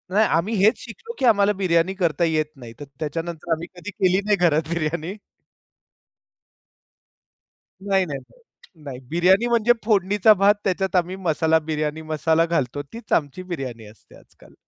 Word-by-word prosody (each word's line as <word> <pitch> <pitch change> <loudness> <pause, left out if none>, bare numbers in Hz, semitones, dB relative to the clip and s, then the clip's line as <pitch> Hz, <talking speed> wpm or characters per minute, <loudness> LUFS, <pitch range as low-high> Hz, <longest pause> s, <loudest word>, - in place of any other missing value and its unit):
नाही. 215 +1 +5
आम्ही 200 +7 -1
हेच 215 - +4
शिकलो 450 - -9
की 265 - +1
आम्हाला 205 -3 +4
बिर्याणी 170 0 +2
करता 170 -4 0
येत 155 -2 +1
नाही. 120 -4 -11
तर 145 - -7
त्याच्यानंतर 165 +2 -5
आम्ही 165 +1 -1
कधी 175 +2 -8
केली 185 0 +1
नाही 210 -1 +3
घरात 155 0 0
बिर्याणी. 170 +2 -3 2.7
नाही, 195 -1 +2
नाही, 140 -5 -5
नाही, 180 - -24
नाही. 135 -4 -7
बिर्याणी 185 +7 +3
म्हणजे 235 0 +3
फोडणीचा 205 0 +4
भात 200 +1 +4
त्याच्यात 190 0 -1
आम्ही 180 +1 +1
मसाला 160 -3 +1
बिर्याणी 155 0 -2
मसाला 160 +1 +1
घालतो 145 -5 -1
तीच 230 0 -6
आमची 150 +4 -1
बिर्याणी 135 -11 -6
असते 105 +1 -18
आजकाल. - - -21
170 Hz, 150 wpm, -22 LUFS, 155-195 Hz, 2.7 s, नाही